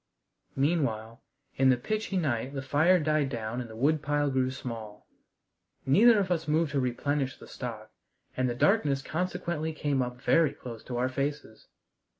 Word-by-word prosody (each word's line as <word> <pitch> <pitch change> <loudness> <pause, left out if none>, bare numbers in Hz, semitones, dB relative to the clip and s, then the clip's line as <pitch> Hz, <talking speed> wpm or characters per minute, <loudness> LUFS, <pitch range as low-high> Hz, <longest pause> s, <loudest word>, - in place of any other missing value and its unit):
Meanwhile, 135 -6 0 0.4
in 135 0 +5
the 130 - +4
pitchy 215 - -2
night 135 -4 -1
the 135 - -3
fire 155 +7 +4
died 155 -2 +1
down 120 -1 -4
and 120 - -8
the 110 - -10
woodpile 145 +2 +1
grew 130 -1 +1
small. 115 -5 -7 0.8
Neither 220 - +6
of 190 -3 0
us 165 -2 0
moved 155 0 +1
to 140 - 0
replenish 130 +2 -1
the - - -13
stock, 110 -3 -7 0.4
and 130 0 +1
the 120 - -2
darkness 145 - +2
consequently 170 -2 -2
came 145 -3 0
up 125 0 -4
very 160 +2 +3
close 115 -3 -9
to 125 - -4
our 125 +1 +1
faces. 140 -4 -4
140 Hz, 160 wpm, -29 LUFS, 125-155 Hz, 0.8 s, Neither